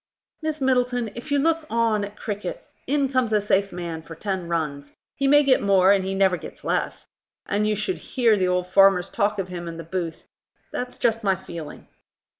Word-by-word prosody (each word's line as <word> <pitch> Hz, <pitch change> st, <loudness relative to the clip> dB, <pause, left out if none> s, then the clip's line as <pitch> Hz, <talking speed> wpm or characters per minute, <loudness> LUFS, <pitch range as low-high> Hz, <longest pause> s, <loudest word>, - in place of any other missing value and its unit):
Miss 310 Hz, -1 st, -2 dB
Middleton, 250 Hz, -3 st, +1 dB
if 240 Hz, +5 st, -9 dB
you 285 Hz, -, +3 dB
look 320 Hz, +2 st, +1 dB
on 225 Hz, -3 st, +1 dB
at 205 Hz, +1 st, -6 dB
cricket, 205 Hz, -4 st, -5 dB, 0.2 s
in 280 Hz, +1 st, +2 dB
comes 255 Hz, -4 st, +1 dB
a 210 Hz, -, +4 dB
safe 200 Hz, -1 st, +1 dB
man 170 Hz, -2 st, -5 dB
for 165 Hz, 0 st, -10 dB
ten 190 Hz, 0 st, -3 dB
runs. 150 Hz, -4 st, -3 dB, 0.2 s
He 275 Hz, -, 0 dB
may 290 Hz, +1 st, +6 dB
get 270 Hz, -2 st, +4 dB
more, 195 Hz, -1 st, +5 dB
and 195 Hz, -1 st, +3 dB
he 190 Hz, +1 st, -2 dB
never 190 Hz, -2 st, +3 dB
gets -, -, -11 dB
less; -, -, -2 dB, 0.4 s
and 210 Hz, +1 st, 0 dB
you 215 Hz, -, +1 dB
should 290 Hz, -, -2 dB
hear 235 Hz, -4 st, +2 dB
the 185 Hz, -2 st, +1 dB
old 180 Hz, 0 st, +1 dB
farmers 190 Hz, -1 st, +4 dB
talk 205 Hz, +1 st, 0 dB
of 190 Hz, -2 st, -3 dB
him 175 Hz, -1 st, -6 dB
in 165 Hz, -1 st, -6 dB
the 165 Hz, -, -6 dB
booth. 165 Hz, 0 st, -4 dB, 0.5 s
That's 250 Hz, 0 st, -5 dB
just 225 Hz, -1 st, +1 dB
my 195 Hz, -2 st, +3 dB
feeling." 165 Hz, -4 st, -9 dB
200 Hz, 205 wpm, -24 LUFS, 180-245 Hz, 0.5 s, may